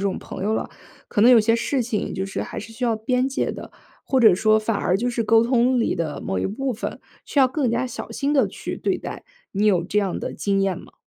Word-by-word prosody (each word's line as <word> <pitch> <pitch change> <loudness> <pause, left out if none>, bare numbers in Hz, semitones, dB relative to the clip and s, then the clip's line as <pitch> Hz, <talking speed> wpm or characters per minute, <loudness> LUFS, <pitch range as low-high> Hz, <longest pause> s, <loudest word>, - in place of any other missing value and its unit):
种 195 -1 -1
朋 - - -8
友 215 +2 0
了， - - -2 0.4
可 205 - -1
能 240 +3 +7
有 245 - +8
些 225 +1 +3
事 250 +3 0
情 225 -3 -2
就 190 +1 -3
是 195 - -4
还 - - -6
是 225 +2 -8
需 245 +2 -4
要 230 - +2
边 250 +3 0
界 270 - -1
的。 - - -9 0.4
或 265 -2 +3
者 215 -6 +7
说 215 +1 +4
反 215 -1 -1
而 185 -1 +1
就 245 +4 -1
是 235 -2 -1
沟 225 +1 +5
通 245 +1 +2
里 230 - 0
的 155 -4 -3
某 95 - -2
一 - - 0
部 260 +6 -2
分， 225 - -5 0.2
需 285 - +1
要 260 - +5
更 275 -2 0
加 235 +3 0
小 245 - -6
心 280 +1 -1
地 275 - +4
去 - - -6
对 - - 0
待， - - -8 0.3
你 205 +2 0
有 180 -5 +3
这 200 +4 -1
样 195 -3 -1
的 - - -4
经 200 -1 0
验 195 -3 0
吗？ - - -15
225 Hz, 280 characters per minute, -23 LUFS, 200-250 Hz, 0.4 s, 有